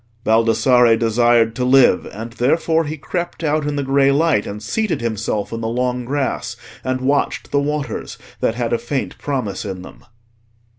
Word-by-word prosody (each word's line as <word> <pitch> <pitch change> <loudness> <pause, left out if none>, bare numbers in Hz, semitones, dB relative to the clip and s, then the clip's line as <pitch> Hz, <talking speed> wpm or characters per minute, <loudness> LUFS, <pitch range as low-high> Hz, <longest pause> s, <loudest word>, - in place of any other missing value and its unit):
Baldassarre 115 +1 +4
desired 115 0 +3
to 125 - -2
live; 125 -6 +4
and 115 +3 -7
therefore 160 +6 +1
he 155 +2 -4
crept 175 +3 -4
out 150 -1 0
in 145 - -2
the 140 - -1
grey 135 0 +3
light, 145 -6 +2
and 105 +1 -6
seated 215 - -1
himself 110 -2 -2
in 115 - -4
the 110 - -2
long 125 +1 -1
grass, 140 +1 -2 0.3
and 130 0 -2
watched 140 +2 0
the 140 - +2
waters 150 0 -3 0.2
that 115 - 0
had 120 -1 -1
a 120 - +1
faint 130 +3 -4
promise 125 -9 -3
in 95 -3 -6
them. - - -13
125 Hz, 170 wpm, -19 LUFS, 115-145 Hz, 0.3 s, Baldassarre